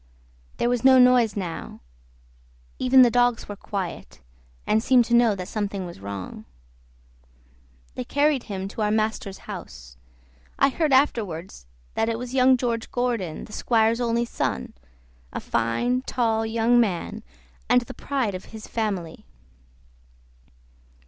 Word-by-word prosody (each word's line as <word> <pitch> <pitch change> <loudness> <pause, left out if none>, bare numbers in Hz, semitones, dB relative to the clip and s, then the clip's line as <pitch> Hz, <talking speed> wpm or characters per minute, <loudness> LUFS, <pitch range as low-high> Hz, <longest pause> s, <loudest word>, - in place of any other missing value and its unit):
There - - +1
was 245 -1 0
no 265 0 +7
noise 250 -4 +5
now; 175 -4 -5 1.0
even 255 0 +6
the 240 - +4
dogs 245 -1 +2
were 205 - -6
quiet, 195 -3 -6 0.5
and 220 - +2
seemed 245 0 +4
to 235 - -2
know 235 -3 +5
that 180 -2 -6
something 200 -3 -3
was 175 - -9
wrong. 100 -1 -7 1.5
They - - -4
carried 285 - +1
him 195 -2 -4
to 215 - -6
our 210 - +2
master's 215 -2 -1
house. - - -9 0.6
I 275 - +4
heard 305 +2 0
afterward 205 - +1 0.4
that 225 - 0
it 225 - -1
was 250 +1 -7
young 260 0 +5
George 235 -2 -2
Gordon, 235 -9 -2
the 210 - -14
squire's 230 0 +2
only 235 0 +1
son, 65 - -3 0.6
a - - -4
fine, 240 - 0
tall 225 -4 0
young 230 +2 +3
man, 215 0 -1 0.5
and 245 0 +5
the 240 - -9
pride 260 -8 -2
of 185 - -7
his 220 -1 -10
family. 195 -8 -4
225 Hz, 140 wpm, -24 LUFS, 195-245 Hz, 1.5 s, no